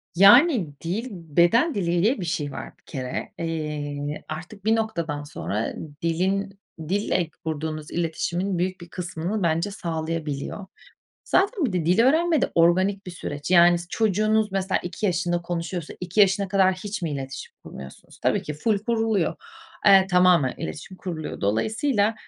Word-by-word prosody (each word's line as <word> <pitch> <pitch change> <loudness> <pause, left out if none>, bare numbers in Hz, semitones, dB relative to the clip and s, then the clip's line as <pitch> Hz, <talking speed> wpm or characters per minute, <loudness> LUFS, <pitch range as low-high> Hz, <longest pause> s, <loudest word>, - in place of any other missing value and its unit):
Yani 205 - +6
dil, 200 +9 -2
beden 175 - +2
dili 175 -2 0
diye 230 +2 +2
bir - - -3
şey 155 -4 -2
var - - -8
bir - - -34
kere. 130 -4 -5
Eee, 150 -3 -4
artık 175 +6 -8
bir 220 +1 +4
noktadan 170 -10 -2
sonra 110 -7 -3 0.3
dilin, 190 +4 -1 0.3
dille 190 -4 0 0.2
kurduğunuz 155 -1 -4
iletişimin 175 +3 -1
büyük 185 +1 -2
bir 170 - -11
kısmını 180 +3 -3
bence 170 +4 +1
sağlayabiliyor. 165 -1 -4 0.6
Zaten 390 -1 +2
bir 230 - 0
de 175 -3 -1
dil 180 +6 +4
öğrenme 315 +5 +3
de - - +1
organik 185 +4 +3
bir - - -5
süreç. 145 -3 -6
Yani 175 -1 +6
s 175 - -8
çocuğunuz 215 0 +1
mesela 190 -1 0
2 180 +4 -3
yaşında 175 -1 0
konuşuyorsa. 170 -1 -4
2 180 +3 0
yaşına 200 0 +4
kadar 190 -1 +3
hiç 200 +2 -6
mi 165 - -1
iletişim 135 -2 -6
kurmuyorsunuz? 65 0 -11
Tabii - - +2
ki 150 - -5
ful 205 +7 +1
kuruluyor. 220 -4 0 0.5
Eee, 195 -1 +7
tamamen 180 -7 +4
iletişim 175 +5 -7
kuruluyor. 165 -5 -6
Dolayısıyla, 215 - +1
180 Hz, 150 wpm, -24 LUFS, 160-205 Hz, 0.6 s, Eee